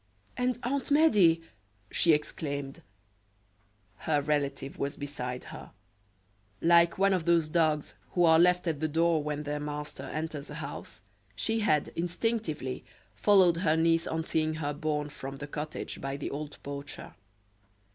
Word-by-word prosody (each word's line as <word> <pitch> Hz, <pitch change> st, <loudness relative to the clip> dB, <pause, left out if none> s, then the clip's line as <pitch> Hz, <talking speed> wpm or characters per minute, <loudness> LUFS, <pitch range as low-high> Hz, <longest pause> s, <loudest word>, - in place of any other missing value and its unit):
"And 250 Hz, -1 st, 0 dB
Aunt 270 Hz, +3 st, -1 dB
Medea!" 215 Hz, -, +5 dB, 0.5 s
she 170 Hz, -, +4 dB
exclaimed. 145 Hz, -2 st, -2 dB, 1.2 s
Her 150 Hz, -2 st, +1 dB
relative 140 Hz, -2 st, -2 dB
was 140 Hz, +1 st, -2 dB
beside 125 Hz, -3 st, -5 dB
her; -, -, -10 dB, 0.9 s
like 170 Hz, 0 st, +5 dB
one 195 Hz, 0 st, +4 dB
of 180 Hz, -4 st, 0 dB
those 170 Hz, -2 st, +3 dB
dogs 155 Hz, -7 st, +1 dB, 0.2 s
who 175 Hz, -1 st, +4 dB
are 160 Hz, -1 st, +6 dB
left 180 Hz, +1 st, +4 dB
at 160 Hz, -4 st, -1 dB
the 155 Hz, -, 0 dB
door 165 Hz, +1 st, +2 dB
when 150 Hz, 0 st, -3 dB
their 150 Hz, 0 st, -3 dB
master 150 Hz, -1 st, -5 dB
enters 150 Hz, 0 st, -5 dB
a 150 Hz, -, -7 dB
house, 145 Hz, -2 st, -7 dB, 0.3 s
she 225 Hz, 0 st, 0 dB
had, 155 Hz, -9 st, +2 dB
instinctively 175 Hz, -, -2 dB, 0.3 s
followed 190 Hz, -5 st, +5 dB
her 165 Hz, -3 st, +2 dB
niece 165 Hz, 0 st, +3 dB
on 160 Hz, 0 st, -1 dB
seeing 155 Hz, -1 st, 0 dB
her 145 Hz, -2 st, -2 dB
borne 150 Hz, -1 st, -2 dB
from 135 Hz, -1 st, -7 dB
the 145 Hz, -, -6 dB
cottage 150 Hz, +1 st, -5 dB
by 135 Hz, 0 st, -3 dB
the 140 Hz, -, -4 dB
old 145 Hz, +1 st, -6 dB
poacher. 140 Hz, 0 st, -7 dB
155 Hz, 145 wpm, -29 LUFS, 145-170 Hz, 1.2 s, are